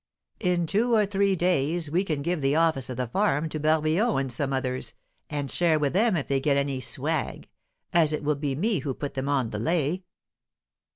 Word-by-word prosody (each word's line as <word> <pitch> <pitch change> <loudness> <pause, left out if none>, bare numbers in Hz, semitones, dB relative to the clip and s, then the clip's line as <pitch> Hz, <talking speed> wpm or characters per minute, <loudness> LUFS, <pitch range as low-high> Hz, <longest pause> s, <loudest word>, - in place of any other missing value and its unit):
In 180 -3 +1
two 230 +8 +2
or 215 -1 +4
three 200 -1 +1
days 170 -2 +1
we 180 +4 +2
can 155 -7 -2
'give 170 0 -1
the 135 +1 +2
office' 160 -6 +2
of 125 - -5
the 125 - -1
farm 160 - 0
to 155 - -4
Barbillon 155 +8 +2
and 135 -2 -2
some 135 +3 -2
others, 130 -3 -3 0.3
and 145 -3 -3
share 170 -3 +3
with 145 -1 0
them 210 0 +3
if 145 - -3
they 135 -1 +1
get 140 0 +2
any 140 -1 -1
'swag,' - - -2 0.5
as 165 -3 +4
it 150 - -2
will 150 +1 +2
be 140 -1 -2
me 200 +5 +1
who 135 -1 -3
put 145 - -5
them 135 0 -3
on 130 -5 0
the 105 - -4
'lay.'" 165 - 0
150 Hz, 210 wpm, -26 LUFS, 135-175 Hz, 0.5 s, or